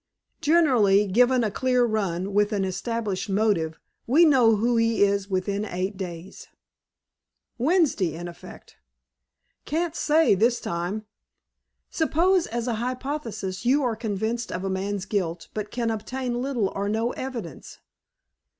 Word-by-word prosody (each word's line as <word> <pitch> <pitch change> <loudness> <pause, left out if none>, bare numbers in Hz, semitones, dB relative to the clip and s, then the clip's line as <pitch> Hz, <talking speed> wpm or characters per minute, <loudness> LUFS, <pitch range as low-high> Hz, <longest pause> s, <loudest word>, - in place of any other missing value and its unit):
"Generally, 250 - +4
given 245 +4 +4
a 215 - 0
clear 250 +2 +2
run, 195 -4 -2
with 205 +1 +2
an 195 -2 0
established 205 +1 -3
motive, 195 -6 0 0.3
we 305 +8 +6
know 250 -7 +5
who 235 +3 +1
he 230 -2 +3
is 200 0 +1
within 200 +2 -1
eight 190 0 -3
days." 180 -1 -8 1.1
"Wednesday, 265 - +2
in 175 +1 -6
effect?" 170 - -12 0.9
"Can't 330 +2 -1
say, 315 -3 +3
this 230 +5 +2
time?" 175 +6 -3 0.9
"Suppose, 345 +3 +2
as 235 +1 -3
a 240 - 0
hypothesis, 250 -7 -4
you 270 +4 +3
are 240 -3 0
convinced 220 +2 -3
of 180 - -4
a 195 - -2
man's 195 +1 -2
guilt, 175 -5 -3
but 210 -1 -4
can 235 0 -1
obtain 245 +3 -3
little 250 -7 0
or 200 +1 -2
no 225 +3 0
evidence?" 240 - -7
220 Hz, 135 wpm, -25 LUFS, 195-250 Hz, 1.1 s, we